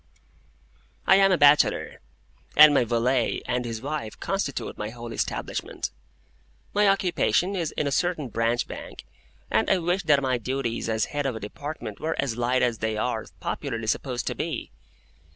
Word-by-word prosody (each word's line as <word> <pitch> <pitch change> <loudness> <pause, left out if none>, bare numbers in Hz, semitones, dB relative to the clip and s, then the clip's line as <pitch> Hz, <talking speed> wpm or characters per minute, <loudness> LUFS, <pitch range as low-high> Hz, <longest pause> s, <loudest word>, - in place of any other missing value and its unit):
I 190 - +6
am 195 0 +5
a 185 - +4
bachelor, 145 0 +4 0.6
and 150 0 +10
my 125 - +3
valet 120 +2 +1
and 125 0 -1
his 115 0 -5
wife 140 -6 -4
constitute 195 -8 -2
my 105 - -4
whole 120 0 -8
establishment. - - -3 0.8
My 205 0 +4
occupation 190 0 +2
is 170 -5 -1
in - - -1
a 140 - 0
certain 160 -3 0
Branch 115 +2 0
Bank, - - -9 0.5
and - - +2
I 190 - +4
wish 180 +2 0
that 145 -3 +5
my 130 -2 0
duties 120 -1 -2
as 110 -1 +1
head 145 -1 0
of 130 - -2
a - - -5
Department 115 0 -7
were 160 +1 -2
as 125 -5 0
light 120 +2 +1
as 120 -3 0
they 110 -1 -1
are - - -2
popularly 115 -1 -3
supposed 125 +2 -1
to - - -1
be. - - -4
130 Hz, 170 wpm, -26 LUFS, 115-155 Hz, 0.8 s, and